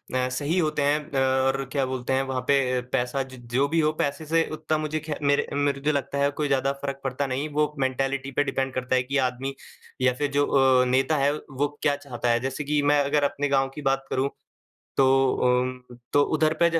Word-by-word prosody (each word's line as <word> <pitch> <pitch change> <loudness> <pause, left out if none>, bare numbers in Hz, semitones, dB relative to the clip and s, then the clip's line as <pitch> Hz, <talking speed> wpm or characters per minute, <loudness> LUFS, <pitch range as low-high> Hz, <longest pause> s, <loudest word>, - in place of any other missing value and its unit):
अ, 130 0 +1
सही 145 +7 -1
होते 155 -3 0
हैं, 145 +2 +2
अ, 135 - -2 0.3
और 135 +1 0
क्या 140 -2 +1
बोलते 130 0 -3
हैं, 135 - +2
वहाँ 130 -1 -2
पे 130 -3 +2
पैसा 135 +1 0
ज 130 -1 -12 0.2
जो 140 +3 +3
भी 165 +2 +1
हो 155 0 +3
पैसे 145 +1 -2
से 165 +1 +2
उतना 155 0 -1
मुझे 155 0 -2
खै 155 -1 -5
मेरे 140 0 +2
मेरे 145 -1 0
जो 150 +1 +2
लगता 140 0 -2
है, 140 0 +3
कोई 150 0 -2
ज्यादा 135 0 +1
फर्क 140 -1 -4
पड़ता 135 +1 -2
नहीं। 135 +4 -2
वो 150 0 +1
मेंटालिटी 135 +1 -1
पे 145 - +1
डिपेंड 135 -1 -2
करता 130 0 -1
है 125 - +2
कि 140 +2 -2
आदमी 135 +2 -6 0.5
या 130 -1 +3
फिर 145 +2 -2
जो 145 0 +2
अ, 130 -2 +4
नेता 135 +4 +2
है 140 +1 +3
वो 145 -1 -3
क्या 145 -1 +2
चाहता 130 -4 -4
है। 115 - +2
जैसे 135 +4 -3
कि 145 +1 +1
मैं 145 0 +3
अगर 145 +1 +1
अपने 145 0 0
गाँव 135 -1 +2
की 150 - -6
बात 135 0 0
करूँ, 135 +1 0 0.7
तो 135 - +5 0.4
अम्म 125 0 0 0.2
तो 145 - +5
उधर 155 0 +2
पे - - +7
140 Hz, 225 wpm, -25 LUFS, 130-145 Hz, 0.7 s, पे